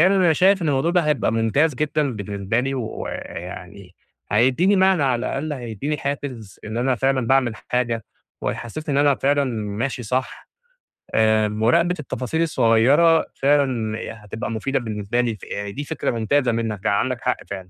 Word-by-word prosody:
أنا 185 Hz, -1 st, +5 dB
شايف 190 Hz, +3 st, +3 dB
إن 160 Hz, -, 0 dB
الموضوع 145 Hz, +4 st, +1 dB
ده 180 Hz, 0 st, +3 dB
هيبقى 150 Hz, -7 st, +1 dB
ممتاز 120 Hz, +7 st, +2 dB
جدًا 150 Hz, -1 st, 0 dB
بالنسبة 100 Hz, +2 st, -2 dB
لي 135 Hz, +1 st, -2 dB
ويعني، 90 Hz, -5 st, -7 dB, 0.4 s
هيديني 130 Hz, -, +3 dB
معنى 190 Hz, -4 st, +4 dB
على 125 Hz, -3 st, +1 dB
الأقل، 150 Hz, +3 st, -3 dB
هيديني 130 Hz, +3 st, -4 dB
حافز، 130 Hz, -8 st, -5 dB
إن 110 Hz, +1 st, -5 dB
أنا 125 Hz, +2 st, +1 dB
فعلًا 130 Hz, 0 st, 0 dB
باعمل 125 Hz, -3 st, +2 dB
حاجة، 120 Hz, -2 st, -2 dB, 0.4 s
وهيحسسني 145 Hz, +5 st, -4 dB
إن 140 Hz, -, +3 dB
أنا 140 Hz, -, +5 dB
فعلًا 140 Hz, +1 st, +1 dB, 0.3 s
ماشي 130 Hz, +1 st, -2 dB
صح، 125 Hz, +4 st, -3 dB, 0.7 s
آآ 110 Hz, -1 st, +4 dB
مراقبة 125 Hz, +12 st, +2 dB
التفاصيل 145 Hz, +2 st, -3 dB
الصغيّرة 150 Hz, +3 st, +4 dB
فعلًا 130 Hz, -6 st, +1 dB, 0.3 s
هتبقى 110 Hz, +3 st, -5 dB
مفيدة 125 Hz, +5 st, -1 dB
بالنسبة 110 Hz, 0 st, -2 dB
لي، 115 Hz, -3 st, -1 dB
فدي 100 Hz, +7 st, -6 dB
فكرة 155 Hz, -2 st, -2 dB
ممتازة 120 Hz, +3 st, +1 dB
منّك 110 Hz, -3 st, -3 dB
يعني 100 Hz, -1 st, +3 dB
عندك 130 Hz, 0 st, -2 dB
حق 125 Hz, -1 st, 0 dB
فعلًا. 95 Hz, -2 st, -7 dB
125 Hz, 155 wpm, -22 LUFS, 110-145 Hz, 0.7 s, أنا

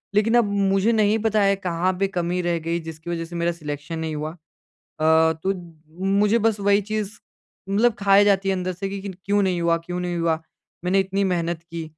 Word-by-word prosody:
लेकिन 225 Hz, +3 st, +3 dB
अब 235 Hz, -, +4 dB, 0.3 s
मुझे 195 Hz, +4 st, +3 dB
नहीं 215 Hz, 0 st, +3 dB
पता 215 Hz, -1 st, +2 dB
है 200 Hz, 0 st, +4 dB
कहाँ 185 Hz, -1 st, -1 dB
पे 195 Hz, -, +2 dB
कमी 180 Hz, -1 st, -1 dB
रह 175 Hz, -1 st, 0 dB
गई 165 Hz, +2 st, -2 dB
जिसकी 160 Hz, +1 st, -9 dB
वज़ह 165 Hz, -1 st, -2 dB
से 170 Hz, +1 st, -10 dB
मेरा 170 Hz, 0 st, +1 dB
सिलेक्शन 150 Hz, -1 st, -6 dB
नहीं 160 Hz, -1 st, -3 dB
हुआ। 155 Hz, +1 st, -3 dB, 0.5 s
अ, 160 Hz, +1 st, +2 dB
तो 195 Hz, +1 st, +1 dB, 0.7 s
मुझे 210 Hz, +3 st, +3 dB
बस 220 Hz, -2 st, +1 dB
वही 200 Hz, +1 st, +3 dB
चीज़ 215 Hz, 0 st, -4 dB, 0.5 s
मतलब 215 Hz, +4 st, +3 dB
खाए 200 Hz, 0 st, +5 dB
जाती 195 Hz, -1 st, +2 dB
है 190 Hz, -, +2 dB
अंदर 185 Hz, 0 st, -2 dB
से 195 Hz, +2 st, -4 dB
कि 195 Hz, 0 st, -5 dB, 0.2 s
क्यों 205 Hz, +1 st, +2 dB
नहीं 180 Hz, -2 st, 0 dB
हुआ 170 Hz, 0 st, +2 dB
क्यों 180 Hz, +1 st, -4 dB
नहीं 175 Hz, -1 st, -2 dB
हुआ। 165 Hz, -1 st, 0 dB, 0.4 s
मैंने 190 Hz, +2 st, +3 dB
इतनी 195 Hz, +1 st, 0 dB
मेहनत 170 Hz, -3 st, -1 dB
की 170 Hz, 0 st, -6 dB
185 Hz, 205 wpm, -23 LUFS, 170-200 Hz, 0.7 s, खाए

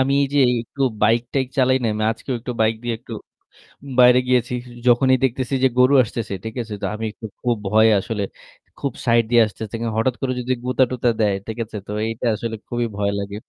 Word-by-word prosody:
আমি 135 Hz, +1 st, +2 dB, 0.2 s
যে -, -, +3 dB, 0.2 s
একটু 135 Hz, +4 st, -6 dB, 0.2 s
বাইক-টাইক 120 Hz, +4 st, +2 dB
চালাই 130 Hz, 0 st, +4 dB
না? -, -, +1 dB
আমি 110 Hz, 0 st, -1 dB
আজকেও 125 Hz, +3 st, -5 dB
একটু 125 Hz, +1 st, -5 dB
বাইক 110 Hz, +1 st, +2 dB
দিয়ে 120 Hz, -1 st, -2 dB
একটু 120 Hz, -1 st, -12 dB, 0.9 s
বাইরে 125 Hz, 0 st, +7 dB
গিয়েছি। 125 Hz, -1 st, +1 dB, 0.3 s
যখনই 130 Hz, +2 st, +5 dB
দেখতেছি 130 Hz, +1 st, -1 dB
যে -, -, +7 dB
গরু 130 Hz, +3 st, +5 dB
আসতেছে। 110 Hz, -2 st, -5 dB
ঠিক 110 Hz, -, -6 dB
আছে? 110 Hz, -2 st, -7 dB
তো -, -, -2 dB
আমি 110 Hz, +1 st, -4 dB
একটু 110 Hz, -, -11 dB, 0.2 s
খুব 120 Hz, -1 st, +1 dB
ভয়ে 110 Hz, +1 st, +5 dB
আসলে 105 Hz, +1 st, -4 dB, 0.6 s
খুব 140 Hz, -, -2 dB
সাইড 115 Hz, -1 st, +4 dB
দিয়ে 120 Hz, -1 st, +6 dB
আসতেছি। 105 Hz, +1 st, -8 dB
কারন 115 Hz, -2 st, -2 dB
হঠাৎ 120 Hz, +2 st, +1 dB
করে 130 Hz, -1 st, 0 dB
যদি 125 Hz, +1 st, -1 dB
গুতা-টুতা 125 Hz, -1 st, +1 dB
দেয়, 105 Hz, -2 st, +2 dB
ঠিক 110 Hz, +1 st, -5 dB
আছে? 105 Hz, -, -8 dB
তো -, -, -6 dB, 0.2 s
এইটা 115 Hz, +2 st, -4 dB
আসলে 115 Hz, 0 st, -4 dB
খুবই 120 Hz, 0 st, -1 dB
ভয় 100 Hz, 0 st, 0 dB
লাগে। 100 Hz, 0 st, -5 dB
120 Hz, 200 wpm, -21 LUFS, 110-125 Hz, 0.9 s, বাইরে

